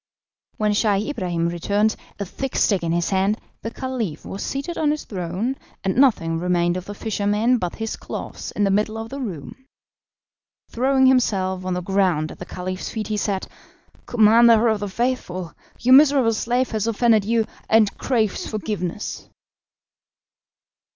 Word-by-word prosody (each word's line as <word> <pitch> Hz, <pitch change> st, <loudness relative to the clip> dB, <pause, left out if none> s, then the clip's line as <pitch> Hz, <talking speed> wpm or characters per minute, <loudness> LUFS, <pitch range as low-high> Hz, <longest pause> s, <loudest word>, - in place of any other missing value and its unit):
When 210 Hz, -1 st, +1 dB
Scheih 205 Hz, +1 st, +1 dB
Ibrahim 175 Hz, -9 st, -1 dB
returned, 200 Hz, +6 st, +1 dB, 0.2 s
a 200 Hz, -, -3 dB
thick 270 Hz, +8 st, -5 dB
stick 200 Hz, -4 st, +2 dB
in 165 Hz, -1 st, -1 dB
his 170 Hz, +2 st, 0 dB
hand, 195 Hz, +2 st, +1 dB, 0.2 s
the 225 Hz, -, -4 dB
Caliph 230 Hz, -, -4 dB
was 195 Hz, -, -6 dB
seated 280 Hz, +6 st, -3 dB
on 305 Hz, -, +1 dB
his 300 Hz, 0 st, -1 dB
throne, 190 Hz, +7 st, -3 dB, 0.3 s
and 190 Hz, -1 st, 0 dB
nothing 170 Hz, -12 st, +3 dB
remained 175 Hz, 0 st, +1 dB
of 185 Hz, 0 st, -5 dB
the 205 Hz, -, -7 dB
fisherman 215 Hz, +3 st, +1 dB
but 180 Hz, -3 st, -3 dB
his 225 Hz, 0 st, -4 dB
clothes -, -, -7 dB
in 210 Hz, -, 0 dB
the 195 Hz, -, +3 dB
middle 210 Hz, +2 st, 0 dB
of 225 Hz, 0 st, -6 dB
the 275 Hz, -, -6 dB
room. 230 Hz, -, -7 dB, 1.0 s
Throwing 265 Hz, +2 st, +3 dB
himself 195 Hz, -8 st, +2 dB
on 185 Hz, -1 st, -1 dB
the 180 Hz, -, -2 dB
ground 180 Hz, -5 st, +1 dB
at -, -, -12 dB
the 180 Hz, -, -8 dB
Caliph's 185 Hz, +1 st, -5 dB
feet, 220 Hz, -2 st, -4 dB
he 215 Hz, -, -1 dB
said: 200 Hz, -2 st, -1 dB, 0.6 s
"Commander 230 Hz, 0 st, +5 dB
of 220 Hz, -1 st, +1 dB
the 205 Hz, -1 st, -4 dB
Faithful, 190 Hz, -6 st, -2 dB, 0.3 s
your 255 Hz, +2 st, +4 dB
miserable 275 Hz, -4 st, +6 dB
slave 245 Hz, +4 st, 0 dB
has 220 Hz, -1 st, -1 dB
offended 230 Hz, -1 st, +3 dB
you, 225 Hz, +1 st, +1 dB, 0.2 s
and 220 Hz, -2 st, +4 dB
craves 225 Hz, -6 st, 0 dB
forgiveness." 210 Hz, -3 st, -4 dB
210 Hz, 160 wpm, -22 LUFS, 185-235 Hz, 1.0 s, miserable